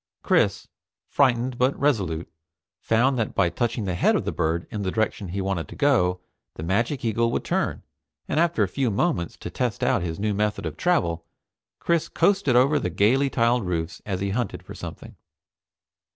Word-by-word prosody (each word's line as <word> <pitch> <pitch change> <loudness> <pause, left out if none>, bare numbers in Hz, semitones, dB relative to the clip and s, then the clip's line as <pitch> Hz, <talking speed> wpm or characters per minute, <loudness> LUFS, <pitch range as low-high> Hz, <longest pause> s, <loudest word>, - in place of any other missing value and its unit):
Chris, - - +2 0.4
frightened 125 -2 +1
but 130 +2 +2
resolute, 95 - 0 0.5
found 125 +3 +2
that 110 - -2
by 90 - +3
touching 115 +4 -2
the 95 - -1
head 90 - +3
of - - -1
the - - -1
bird 80 +2 -1
in 105 -3 -3
the 95 - -1
direction 110 -1 -1
he 95 +3 -4
wanted 95 -4 -2
to - - -10
go, 90 -11 +2 0.4
the 80 - -7
magic 115 - 0
eagle 115 +1 +1
would - - -1
turn, - - -1 0.4
and - - 0
after 165 -10 +2
a - - +1
few 130 +6 -1
moments 85 -5 -1
to - - -7
test 125 -4 -2
out 120 -6 +2
his 80 -2 -3
new 105 +1 -1
method 105 -2 -1
of 80 -1 -4
travel, 85 - +1 0.5
Chris 170 -2 0
coasted 195 -11 +2
over 140 +4 +4
the 90 - -2
gaily 115 +10 +3
tiled 120 -1 +2
roofs 85 -2 -3
as 95 -3 -3
he 100 0 -1
hunted 120 +4 -3
for - - -10
something. - - -9
110 Hz, 185 wpm, -24 LUFS, 90-130 Hz, 0.5 s, over